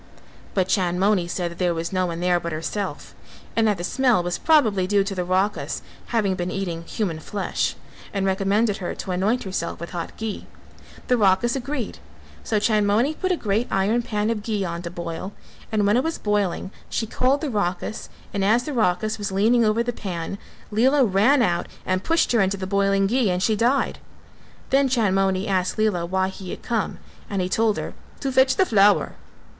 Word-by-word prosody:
But 185 -2 +2
Chandmoni 185 0 +2
said 175 0 -2
that 170 - -11
there 175 -2 +1
was 165 +2 -3
no 185 -1 +1
one 170 0 -4
there 180 -1 +3
but 170 0 -5
herself; 185 +6 -4 0.4
and 225 -1 +3
that 205 -2 +2
the 175 - -5
smell 245 -2 +2
was 175 0 -2
probably 220 - +3
due 200 0 +3
to 200 0 -4
the 180 -2 -2
Rakhas 190 +3 -1 0.2
having 215 -5 +1
been 180 -1 -3
eating 180 -4 -3
human 170 -4 -2
flesh 200 +5 -2 0.4
and 195 -1 -1
recommended 200 +2 +1
her 180 - -4
to 190 - -5
anoint 200 +7 +1
herself 185 -3 -3
with 170 - -7
hot 170 -2 -5
ghee. 220 -2 -5 0.6
The 250 - +3
Rakhas 205 +3 +3
agreed: 265 -3 -4 0.4
so 220 - 0
Chandmoni 215 +5 +2
put 370 +4 -2
a 360 - +1
great 215 +1 0
iron 205 +5 +2
pan 215 -1 -1
of 220 -2 -2
ghee 210 -2 -2
on 170 -1 -4
to 175 - -5
boil, 170 +2 -6 0.4
and 210 -2 +2
when 205 +2 +3
it 255 - +2
was 325 0 -2
boiling 205 -3 -1 0.2
she 225 - -1
called 255 +5 +1
the 300 -4 -2
Rakhas, 205 0 -2 0.2
and 200 -2 0
as 225 +5 +3
the 300 - -4
Rakhas 215 -1 +1
was 205 -2 -3
leaning 225 +5 +3
over 220 +2 +2
the 245 0 -2
pan, 185 -2 -5 0.3
Lela 260 +6 +4
ran 235 +7 +4
out 175 -5 0 0.2
and 185 0 0
pushed 330 0 +2
her 235 -3 +4
into 195 +1 +1
the 190 - -4
boiling 195 0 +2
ghee 235 +1 +2
and 180 0 0
she 220 - +2
died. 245 +6 +1 0.7
Then 275 0 +4
Chandmoni 195 -5 +1
asked 185 -2 0
Lela 200 -6 +1
why 190 +1 0
he 190 -1 -9
had - - -7
come, 230 -4 -1 0.3
and 200 - -2
he 180 - 0
told 220 +1 +2
her, - - -4 0.3
"to 275 - -1
fetch 260 0 +4
the 380 - +3
flower." 205 - +4
200 Hz, 195 wpm, -23 LUFS, 185-230 Hz, 0.7 s, Lela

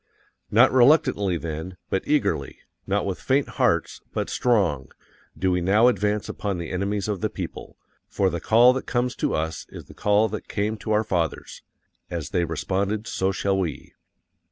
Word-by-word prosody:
NOT 120 +5 +5
RELUCTANTLY 120 - +4
THEN, 80 +3 -6
but 95 - 0
eagerly_, 100 - 0 0.3
not 100 +1 0
with 95 -2 -3
_faint 135 +1 +1
hearts - - +1
BUT - - -2
STRONG, 90 - +1 0.5
do 95 +3 +1
we 90 0 +1
now 105 +7 +4
advance 105 -2 +1
upon 100 -3 -3
the 85 -1 -5
enemies 100 +2 -2
of 100 -4 -3
the - - 0
people. - - -7 0.3
FOR 95 -2 0
THE 85 -1 -4
CALL 120 +3 +6
THAT 130 - -5
COMES 125 0 0
TO - - -1
US 80 +1 -3
is - - -10
the - - -14
call 105 +1 +2
that 110 - -6
came 105 +1 -1
to 105 +2 -5
our 105 0 +3
fathers_. 85 -6 -3 0.5
As 80 -6 -5
they 90 -1 +1
responded 100 +6 -2
so 95 -4 -1
shall 95 +1 0
we. 80 -7 -4
100 Hz, 175 wpm, -24 LUFS, 90-110 Hz, 0.5 s, CALL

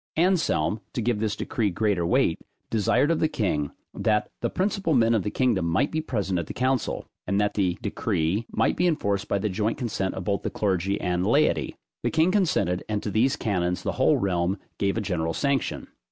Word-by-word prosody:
Anselm, 160 - +2
to 120 - -1
give 120 -2 +1
this 110 -1 -1
decree 110 -3 -1
greater 100 -1 0
weight, 85 - +2 0.3
desired 120 - +2
of 165 - +1
the 155 - +3
king, 80 - -1 0.2
that 105 -1 0
the - - 0
principal 190 -4 0
men 115 -1 +4
of 110 - +2
the 105 - -2
kingdom 115 -7 +1
might 95 - +1
be 160 - -1
present 100 - -1
at 80 - -4
the - - -7
council, 130 -1 0 0.2
and 100 +2 +1
that 105 0 +1
the 95 -4 0
decree 90 +8 -1
might - - +1
be 180 - +2
enforced 100 - 0
by 100 - +1
the 100 - -1
joint 105 +3 -1
consent 110 -6 -2
both 100 +2 0
of - - -26
the - - +1
clergy 95 -1 0
and 90 0 0
laity; 140 +7 +2 0.3
the - - 0
king 160 +3 +3
consented, 160 - +1
and 105 -1 -1
to 105 - -2
these 130 +7 +2
canons 90 - -1
the - - 0
whole - - +5
realm 90 0 0 0.2
gave 100 +2 +1
a - - 0
general 80 -5 -1
sanction. 140 -1 0
105 Hz, 205 wpm, -26 LUFS, 95-130 Hz, 0.3 s, whole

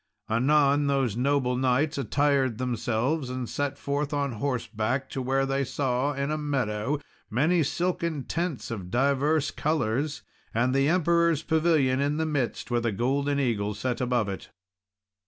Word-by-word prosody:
Anon, 140 +4 +3
those 135 -6 +1
noble 130 0 +1
knights 130 +4 +1
attired 140 -3 +1
themselves 125 +3 -1
and 125 -1 -4
set 145 +2 -2
forth 145 +1 -2
on 140 -1 0
horseback 120 0 -2
to 135 - -3
where 135 +1 +1
they 135 0 0
saw, 135 +1 0
in 140 +1 -2
a 155 - -1
meadow, 135 -2 -1 0.3
many 155 +10 +2
silken 170 -1 -1
tents 165 -7 -3
of 95 -6 -5
divers 140 +6 +2
colours, 145 -1 -1 0.3
and 120 +3 +2
the 135 +2 +3
Emperor's 170 -2 +2
pavilion 155 -6 +2
in 145 +2 0
the 160 - 0
midst, 145 -6 -2
with 120 -1 +1
a 115 - +1
golden 140 +6 0
eagle 105 -6 0
set 125 +4 -2
above 125 -4 +1
it. 95 -1 -6
135 Hz, 150 wpm, -27 LUFS, 125-145 Hz, 0.3 s, Anon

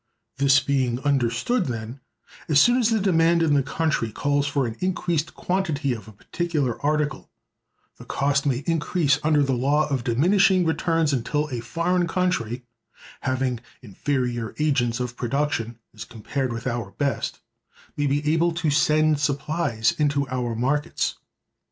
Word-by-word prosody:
This 140 0 +5
being 130 -3 0
understood, 145 - +1
then, 120 +1 -5 0.5
as 150 -2 +5
soon 240 - +5
as 235 -2 +3
the 225 -1 +2
demand 170 -3 +3
in 155 -2 +2
the 140 - +4
country 145 -5 -1
calls 145 +4 0
for 140 -2 0
an 115 -2 -4
increased 175 -4 -1
quantity 160 -8 -1
of 110 -3 -8
a - - -10
particular 140 - -2
article, 150 -1 -1 0.7
the - - -12
cost 140 +1 0
may 135 0 0
increase 160 -3 +1
under 150 -1 +3
the 135 -1 0
law 140 +5 +2
of 135 -4 -1
diminishing 185 - +3
returns 165 -2 +1
until 145 +4 -1
a 125 - -3
foreign 175 +7 0
country—having 125 - -3 0.2
inferior 120 +1 -2
agents 135 -6 +1
of 125 -1 -4
production 120 -2 -2 0.2
as 110 - -8
compared 125 +3 -4
with 115 +2 -5
our 120 -5 -2
best—may 145 +1 -4
be 145 +2 0
able 170 +1 +2
to 165 -3 0
send 155 0 +3
supplies 140 -5 0
into 140 -2 +1
our 125 -2 -2
markets. 135 +6 -1
140 Hz, 145 wpm, -24 LUFS, 125-160 Hz, 0.7 s, This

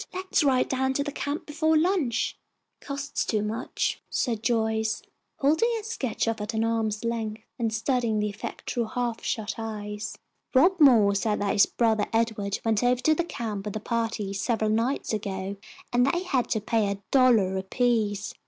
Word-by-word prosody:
Let's 370 -3 +1
ride 260 -3 +3
down 265 0 0
to 280 - 0
the 290 - -4
camp 285 +2 -3
before 315 +1 +2
lunch." 310 - +1 0.4
"Costs 280 0 -3
too 215 -2 0
much," 225 +4 -2
said 230 -5 -1
Joyce, 220 -2 0 0.3
holding 315 +12 +3
her 435 - -6
sketch 275 - -2
off 225 -2 -1
at 215 +2 -4
arm's 220 -1 0
length 220 -2 -3 0.2
and 225 -2 0
studying 225 -1 0
the 210 - +1
effect 205 - -6
through 240 -2 0
half 235 0 -3
shut 220 +1 -2
eyes. 210 -1 -5 0.4
"Rob 355 +8 +5
Moore 230 -9 +6
said 210 +1 0
that 200 -1 +1
his 200 - +5
brother 220 -3 +1
Edward 220 -3 0
went 225 0 +2
over 245 0 +3
to 310 - +4
the 345 - 0
camp 215 -10 -5
with 210 - -4
a - - -1
party, 225 -3 -2
several 215 +1 0
nights 230 +3 0
ago, 195 -2 -3 0.4
and 245 +2 +4
they 345 +6 +1
had 270 -9 0
to 220 - +1
pay 220 0 +1
a 200 0 -6
dollar 235 -8 +4
apiece. 210 0 0
225 Hz, 175 wpm, -26 LUFS, 215-260 Hz, 0.4 s, Moore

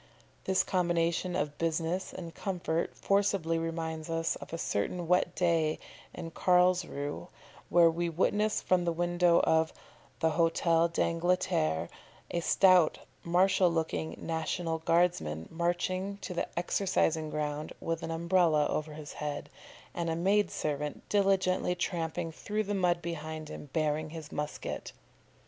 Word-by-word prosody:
This 190 0 +3
combination 175 0 0
of 145 0 -2
business 165 +3 -1
and 170 -3 -8
comfort 175 -4 -2
forcibly 195 -5 +1
reminds 165 -1 -4
us 165 0 0
of - - -11
a 165 - -3
certain 165 - -2
wet 180 +1 +2
day 165 -3 +2 0.3
in 165 -1 -7
Carlsruhe, 180 -5 +1 0.4
where 170 -1 +6
we 170 +1 0
witnessed 205 +6 +1
from 185 -1 +2
the 170 - +1
window 175 0 +3
of 160 0 +2 0.5
the 160 - +2
HĂ´tel 165 0 +2
d'Angleterre 165 - +1 0.4
a 175 - 0
stout, 180 -1 +5 0.3
martial 185 +1 +3
looking 160 -1 -2
national 160 0 -2
guardsman 160 - +1
marching 185 +3 -1
to 180 - -5
the 170 - -1
exercising 175 -3 +1
ground 150 0 -3
with 165 0 -2
an - - -5
Umbrella 165 -2 +3
over 155 0 -2
his 150 -1 -8
head, 145 -1 -5 0.4
and 170 -1 -2
a 160 - 0
maid 195 +3 +2
servant 150 -1 -3
diligently 190 -3 +2
tramping 165 -2 -2
through 210 +6 -2
the 205 0 -3
mud 175 -3 +1
behind 160 -2 -5
him, 145 - -8
bearing 155 0 0
his 160 -1 -8
musket. 150 0 -4
165 Hz, 135 wpm, -30 LUFS, 160-180 Hz, 0.5 s, where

